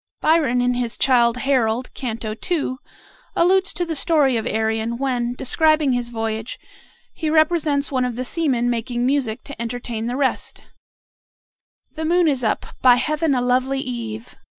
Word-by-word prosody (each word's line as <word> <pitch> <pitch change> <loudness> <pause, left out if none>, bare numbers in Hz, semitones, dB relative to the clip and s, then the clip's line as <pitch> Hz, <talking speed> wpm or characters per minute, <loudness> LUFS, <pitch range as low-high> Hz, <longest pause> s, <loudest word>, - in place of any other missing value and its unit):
Byron, 300 -6 +2
in 250 0 +2
his 245 -2 -2
"Childe 240 -2 +3
Harold," 250 -2 0
Canto 225 -3 -4 0.2
II., 295 -7 -1 0.6
alludes 380 +2 +3
to 350 - -2
the 330 -1 -3
story 290 -4 +3
of 225 - -1
Arion, 220 +1 -1
when, 245 -2 -1
describing 310 +2 +2
his 245 -1 -1
voyage, 225 0 -4 0.6
he 315 - -3
represents 310 -3 +2
one 260 -2 +1
of 250 -2 -2
the 255 +2 -4
seamen 260 -5 0
making 240 +1 -1
music 255 -5 0
to 280 -4 -8
entertain 235 -1 -4
the 245 +2 -2
rest: 275 -2 -1 1.3
"The 320 - -6
moon 345 +1 +3
is 270 -4 +1
up; 220 - 0 0.2
by 250 -1 +7
Heaven 305 +3 +1
a 250 - +1
lovely 255 +2 +1
eve! 235 -3 -6
250 Hz, 155 wpm, -21 LUFS, 235-295 Hz, 1.3 s, by